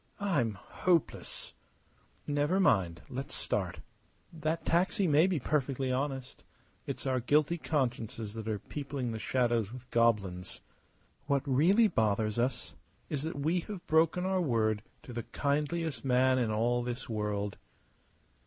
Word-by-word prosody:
I'm 140 - +1
hopeless!" 170 - -1 0.7
"Never 145 +5 +1
mind. 85 - +2
Let's 135 +1 -5
start. - - -2 0.5
That 160 +1 -2
taxi 185 +4 +2
may 155 +3 +5
be 180 -5 0
perfectly 135 -1 0
honest. 130 0 -3 0.4
It's - - -4
our 130 -1 +1
guilty 150 +7 +2
consciences 120 -8 -2
that 110 -1 -6
are 110 -1 0
peopling 140 0 -4
the 110 - -4
shadows 120 -4 +1
with 125 0 -10
goblins. 100 -6 +1 0.7
What 140 -1 +2
really 175 - +5
bothers 110 - +1
us 125 +1 -1 0.4
is 145 - -1
that 160 0 -4
we 160 +5 +1
have 200 -4 -6
broken 165 +3 +3
our 190 -1 +1
word 110 -8 +1 0.2
to 125 - -9
the 120 - -2
kindliest 150 +5 -1
man 130 0 +3
in 120 -3 +1
all 120 +3 +1
this 120 0 -4
world." 105 -2 -2
130 Hz, 135 wpm, -31 LUFS, 115-155 Hz, 0.7 s, may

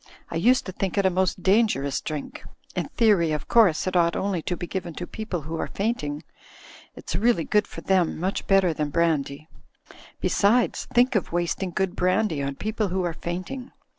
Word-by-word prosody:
"I - - -4
used 245 +10 +3
to 185 - -5
think 190 +1 -3
it 200 - +3
a 190 - +4
most 185 0 0
dangerous 185 - +2
drink. 150 -2 -6 0.3
In - - -1
theory, 205 -9 +3
of 150 - -4
course, 205 -10 +4
it 185 0 -2
ought 170 -1 +3
only 190 -4 -1
to 175 +2 -3
be - - -4
given 175 -2 -5
to 175 - -5
people 205 -4 -5
who 160 +3 -6
are - - -2
fainting. 175 -9 -2 0.7
It's - - -5
really 200 -2 +2
good 210 +4 +1
for - - -9
them, 185 -5 +1
much 185 +3 -2
better 195 -3 +4
than 150 -1 -2
brandy. 155 -2 0 0.7
Besides, 225 +5 +2
think 250 +2 +4
of 210 - 0
wasting 175 +2 -1
good 190 +1 -1
brandy 185 -3 +1
on 140 0 -3
people 215 +4 -2
who 185 0 -1
are 175 -2 -1
fainting 185 +11 -6
185 Hz, 190 wpm, -25 LUFS, 165-205 Hz, 0.7 s, a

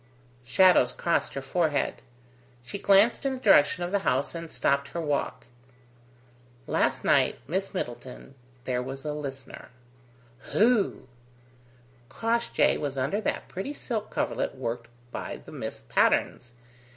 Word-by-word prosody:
Shadows 130 0 +5
crossed 170 +5 0
her 135 - -4
forehead. 150 0 0 0.6
She 200 +11 -6
glanced 200 +7 +4
in 275 -1 0
the - - -8
direction 180 - +5
of 175 - -3
the 200 - +2
house 140 -7 0
and 165 -1 -7
stopped 140 0 +1
her 170 - -5
walk. 145 -3 -2 1.2
"Last - - 0
night, - - +3
Miss 190 +5 -2
Middleton, 125 -3 -6 0.3
there 125 -1 -1
was 135 +2 -7
a 150 - -2
listener." 135 -3 -7 0.8
"Who?" 220 - +2 1.0
"Crossjay 230 +1 +1
was 140 -2 -4
under 140 +11 0
that - - -2
pretty 195 +11 -5
silk 220 -6 -3
coverlet - - -2
worked 120 -2 -4 0.2
by - - -5
the - - -11
Miss - - -6
Patternes. 120 - +1
150 Hz, 130 wpm, -27 LUFS, 135-195 Hz, 1.2 s, Shadows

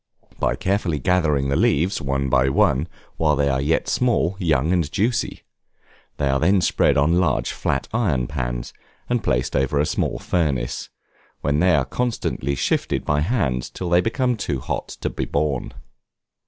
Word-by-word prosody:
By - - +1
carefully 95 -1 0
gathering 75 -3 +1
the 70 - +1
leaves, 85 +9 +2
one 70 0 -1
by 65 0 +3
one, 70 +3 +2 0.3
while 75 -2 +2
they 70 0 +1
are 65 -1 0
yet 75 +4 +1
small, 115 -8 +1
young, 80 -2 +1
and 85 -5 0
juicy. 115 +4 -1 0.7
They 70 - 0
are 70 0 +2
then 95 +5 +3
spread - - +2
on 80 +5 +3
large 60 -9 +1
flat - - -2
iron 85 - +1
pans, - - -4 0.4
and 120 -2 0
placed 65 -3 0
over 70 +2 +1
small - - -1
furnaces, 70 -9 -1 0.5
when 75 +1 +1
they 90 +1 +4
are 70 -3 +2
constantly 90 - -2
shifted - - -1
by 75 - +1
the 75 - 0
hand 70 - -1
till 90 -2 -4
they 90 +1 +5
become 125 +3 0
too 70 -10 -2
hot - - -4
to - - -1
be - - -3
borne. 70 -3 -1
75 Hz, 170 wpm, -22 LUFS, 70-90 Hz, 0.7 s, they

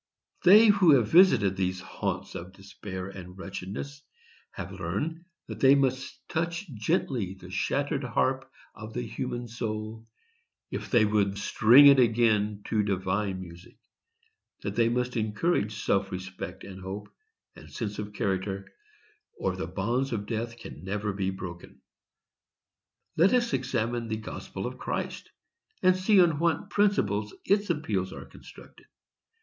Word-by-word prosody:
They 210 +5 +8
who 190 -7 +6
have 115 -5 +2
visited 120 - +5
these 95 -1 -1
haunts 95 - -4
of 90 +2 -8
despair 95 -1 -8
and 90 -1 -10
wretchedness 100 +9 -6 0.5
have - - -7
learned 165 +3 -4 0.2
that - - -8
they 135 +1 +7
must 130 -1 -1
touch 170 +3 -2
gently 110 - -1
the 90 0 -11
shattered 140 - -1
harp 130 +2 0 0.2
of 110 0 -9
the 120 - -2
human 120 +1 -4
soul, 110 -1 -5 0.6
if - - -5
they 115 -4 +4
would 100 -2 +1
string 120 +7 +6
it 140 -1 +8
again 110 -3 +2
to 110 - +1
divine 95 0 -1
music; 85 0 -12 0.9
that - - -3
they 115 -1 +3
must 125 +1 -1
encourage 110 - 0
self 100 0 +1
respect, 95 0 -7
and 95 -1 -9
hope, 100 +2 -6 0.5
and - - -13
sense 105 -3 -4
of 105 0 -5
character, 100 -1 -2 0.7
or 95 -1 -1
the 95 -3 -4
bonds 115 +9 -1
of 105 -2 -3
death 115 +1 -4
can 115 - -10
never 105 +2 -2
be 95 -1 -1
broken. 90 -2 -8 1.4
Let 185 +9 +5
us 240 -1 +1
examine 120 -3 -1
the 110 -1 -2
gospel 110 - -7
of - - -6
Christ, - - -4 0.5
and 185 0 +5
see 190 +2 +4
on 165 -5 +4
what 170 0 0
principles 105 - +1
its 205 0 +2
appeals 105 - -1
are - - -8
constructed. - - -15
110 Hz, 145 wpm, -28 LUFS, 95-135 Hz, 1.4 s, They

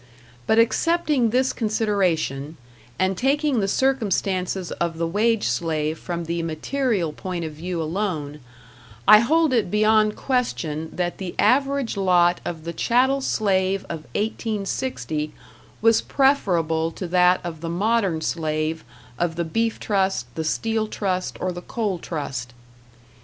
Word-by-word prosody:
But 220 - +3
excepting 295 +1 +2
this 255 +3 +1
consideration, 185 - 0 0.4
and 190 +1 +1
taking 275 - +1
the 195 - 0
circumstances 195 -7 0
of 170 -1 -2
the 165 - 0
wage 215 +6 +1
slave 155 +4 -1
from 170 -1 -4
the 170 +1 -2
material 170 - -1
point 180 -1 -4
of 155 - -5
view 170 +3 -5
alone, 160 -4 -3 0.7
I 215 - +10
hold 310 +5 +3
it 225 -7 +2
beyond 215 +1 +3
question 160 - -2
that 175 -1 -3
the 185 -2 -5
average 275 -3 +2
lot 180 -2 +3
of 165 -2 -5
the 170 +1 -5
chattel 260 +8 +2
slave 195 -5 +1
of 165 - -4 0.2
1860 205 - -2 0.5
was 225 0 +5
preferable 170 - +2
to 185 - -5
that 180 +1 +4
of 165 -3 -6
the 165 - -4
modern 195 -2 +1
slave 155 0 -2 0.4
of 170 -1 0
the 170 0 -1
Beef 225 +7 -1
Trust, 190 - 0
the 160 - -3
Steel 220 +7 -1
Trust, 185 -4 -2
or 185 - -1
the 175 0 -7
Coal 205 -3 -2
Trust. 135 -7 -5
185 Hz, 135 wpm, -23 LUFS, 165-225 Hz, 0.7 s, I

